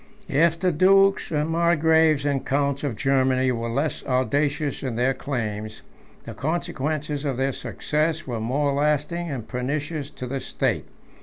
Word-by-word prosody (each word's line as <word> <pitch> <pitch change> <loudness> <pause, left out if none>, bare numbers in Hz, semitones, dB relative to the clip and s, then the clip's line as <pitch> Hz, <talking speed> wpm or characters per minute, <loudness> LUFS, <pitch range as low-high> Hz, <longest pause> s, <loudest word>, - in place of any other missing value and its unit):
If 165 +3 +3
the 180 0 +2
dukes, 195 +4 +4
margraves, 160 -1 +3
and 140 -2 0
counts 140 0 0
of 140 -6 -2
Germany, 130 +1 +2
were 115 -1 -2
less 140 +6 -1
audacious 140 +3 0
in 130 -4 -3
their 125 +3 +2
claims, 110 -6 -4 0.4
the - - -8
consequences 155 -2 -2
of 135 -4 -2
their 135 +1 0
success 155 +4 -1
were 120 -3 -3
more 140 +5 0
lasting 150 +4 0
and 125 -6 -5
pernicious 145 +3 -3
to 130 - -7
the 135 +2 -3
state. - - -1
145 Hz, 145 wpm, -24 LUFS, 130-155 Hz, 0.4 s, dukes